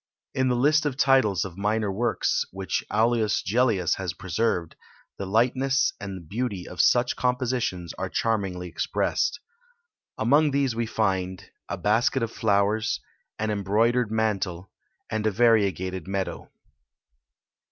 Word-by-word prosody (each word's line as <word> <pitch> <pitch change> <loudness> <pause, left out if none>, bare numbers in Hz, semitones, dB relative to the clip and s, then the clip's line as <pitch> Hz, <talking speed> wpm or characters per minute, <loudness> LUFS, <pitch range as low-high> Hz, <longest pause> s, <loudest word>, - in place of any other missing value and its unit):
In 130 0 +1
the 125 - +2
list 150 +4 +3
of 130 -3 -3
titles 130 -10 +3
of 95 0 -9
minor 105 0 0
works, 115 +5 0
which 95 -2 -3
Aulus 110 0 +2
Gellius 105 -5 +1
has 95 -3 -3
preserved, 95 -2 -1 0.4
the 100 - -4
lightness 130 +6 +2
and 95 -4 -7
beauty 105 -3 -3
of 90 -2 -1
such 120 0 +3
compositions 125 -8 -1
are - - -2
charmingly 95 -6 -1
expressed. 90 - -1 0.8
Among 145 +7 +4
these 135 -4 0
we 115 0 -1
find 95 -4 -2 0.2
a - - -3
Basket 115 +4 +2
of 115 - -2
Flowers; 105 0 +1 0.4
an 110 0 -1
Embroidered 110 +4 +1
Mantle; 100 -5 -1 0.4
and 110 0 0
a - - +2
Variegated 95 -5 +2
Meadow. 95 -1 -3
110 Hz, 130 wpm, -25 LUFS, 95-120 Hz, 0.8 s, Among